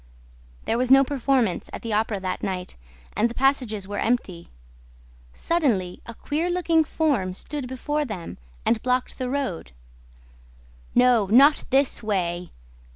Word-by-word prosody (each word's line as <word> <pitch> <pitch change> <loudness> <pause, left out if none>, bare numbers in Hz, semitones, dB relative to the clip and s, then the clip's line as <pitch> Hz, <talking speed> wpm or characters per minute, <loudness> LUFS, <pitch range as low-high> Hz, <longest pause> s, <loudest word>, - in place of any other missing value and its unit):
There 230 - 0
was 255 0 0
no 270 +1 +7
performance 260 -7 0
at - - -8
the 230 -2 -3
Opera 215 -1 0
that 185 -1 -3
night 180 -1 -4 0.4
and 230 - +2
the 235 - -9
passages 250 -7 +1
were 205 0 -4
empty. 195 -8 -2 0.8
Suddenly, 220 - -1
a 235 - -8
queer 315 +8 -2
looking 340 -2 +2
form 270 - -1
stood 285 +4 -6
before 295 +4 -2
them 205 - -7 0.3
and 225 -2 +2
blocked 255 +1 -1
the 255 -1 -2
road: 255 - -3 1.2
"No, 245 -4 +4
not 275 +8 +5
this 270 -1 +2
way!" 180 -5 -2
245 Hz, 140 wpm, -24 LUFS, 200-275 Hz, 1.2 s, no